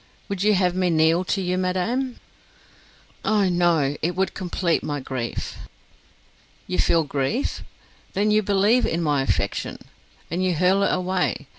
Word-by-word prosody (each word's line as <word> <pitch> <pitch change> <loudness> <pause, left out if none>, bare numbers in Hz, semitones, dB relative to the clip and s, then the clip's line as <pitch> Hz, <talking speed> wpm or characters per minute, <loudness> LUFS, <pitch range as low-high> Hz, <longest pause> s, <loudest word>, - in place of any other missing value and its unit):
Would 200 -2 -3
you 210 +1 +4
have 180 -2 +2
me 185 0 +1
kneel 165 +2 +3
to 195 - -1
you, 180 0 0
madam?" 230 +8 -1 1.0
"Oh, 210 -3 +2
no; 170 -5 +2
it 170 +2 -1
would 190 +1 0
complete 175 -2 -1
my 145 -1 -3
grief." 130 -3 -5 1.1
"You 90 - -3
feel 165 - +3
grief? 145 - -2 0.5
Then 205 +2 +1
you 215 0 +4
believe 205 +4 +3
in 170 +1 -1
my 145 -3 +2
affection, 135 - -1 0.5
and 175 +3 -1
you 185 -2 +1
hurl 185 +4 +3
it - - +2
away. 185 -5 -1
180 Hz, 150 wpm, -23 LUFS, 160-195 Hz, 1.1 s, you